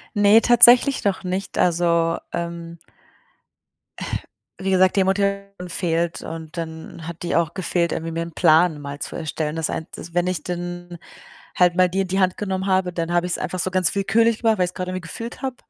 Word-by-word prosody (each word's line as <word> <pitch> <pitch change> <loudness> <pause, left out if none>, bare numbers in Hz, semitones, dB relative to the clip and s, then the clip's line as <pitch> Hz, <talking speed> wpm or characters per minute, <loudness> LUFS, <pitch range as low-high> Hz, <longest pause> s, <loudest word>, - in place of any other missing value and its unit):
Ne, 205 +2 +6
tatsächlich 245 +3 +6
noch 200 -1 0
nicht, 185 +1 -4
also, 170 -1 +2 0.2
ähm 170 -1 -5 1.8
wie 190 - -1
gesagt, 185 +1 +3
die 190 - +4
Motivation 200 -1 -1
fehlt 170 -1 -1
und 160 +1 -8
dann 160 0 -7
hat 170 0 -7
die 170 - -1
auch 165 -2 0
gefehlt, 175 -3 -1
irgendwie 165 +1 -4
mir 165 +1 -2
'n 170 - -9
Plan 160 -2 +4
mal 140 0 -7
zu - - -6
erstellen. 155 -1 -3
Das 160 -1 -2
ein 160 - -4
das 170 - -10
wenn 175 +1 +1
ich 180 -5 -2
dann 175 0 -5 0.6
halt 180 -1 +4
mal 185 0 +5
die 190 +2 -1
in 190 - -2
die 190 +1 0
Hand 185 -1 +2
genommen 190 -2 -3
habe, 185 -1 +1
dann 170 0 -3
habe 175 0 +2
ich 180 - -3
es - - -1
einfach 185 - -4
so 185 - -1
ganz 185 -1 +1
willkürlich 220 +3 +2
gemacht, 225 -2 +3
weil 180 - +2
ich 175 - -5
es - - -35
gerade 185 0 -4
irgendwie 185 0 -4
gefühlt 230 +8 -7
habe 265 -2 -3
180 Hz, 205 wpm, -22 LUFS, 170-190 Hz, 1.8 s, Ne